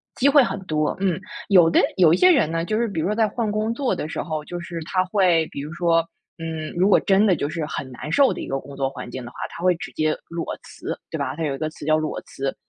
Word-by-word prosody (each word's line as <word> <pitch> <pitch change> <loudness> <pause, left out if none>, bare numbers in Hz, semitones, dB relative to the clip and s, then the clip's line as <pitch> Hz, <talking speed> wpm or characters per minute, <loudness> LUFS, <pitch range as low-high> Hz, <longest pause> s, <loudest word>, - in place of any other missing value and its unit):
机 270 - +3
会 285 -1 +7
很 215 - -2
多， 155 0 0
嗯。 185 -2 0 0.3
有 175 -4 +7
的 - - +4 0.2
有 170 -3 +6
一 - - +3
些 365 - +6
人 270 - +3
呢， 165 0 -1
就 215 +2 -1
是 235 0 +1
比 195 -6 -4
如 165 - 0
说 210 - 0
在 220 -1 +3
换 220 0 -2
工 215 +2 0
作 265 +1 0
的 150 - -4
时 - - -3
候， 155 -2 -4
就 175 0 -5
是 170 -1 -6
他 185 +1 +1
会 180 -4 +3
比 140 - -5
如 150 +2 -7
说， 170 -1 +2 0.3
嗯， 160 -1 -5
如 185 +3 +3
果 - - +6
真 195 +2 +3
的 185 - +4
就 145 0 -2
是 160 -1 -3
很 135 -3 -5
难 150 +5 -7
受 275 +4 +4
的 - - -6
一 - - -6
个 135 0 -2
工 140 +1 -11
作 135 -1 -1
环 125 -3 -8
境 130 0 -6
的 120 - -9
话， - - -17
他 170 - -9
会 180 -1 +4
直 165 - -8
接 155 0 +1
裸 170 0 -4 0.2
辞， - - -6
对 - - -2
吧？ - - -3
它 165 - -4
有 140 - -1
一 - - -7
个 155 +1 -2
词 150 - -11
叫 155 0 +3
裸 155 -1 -2
辞。 135 0 -4
165 Hz, 310 characters per minute, -23 LUFS, 155-195 Hz, 0.3 s, 会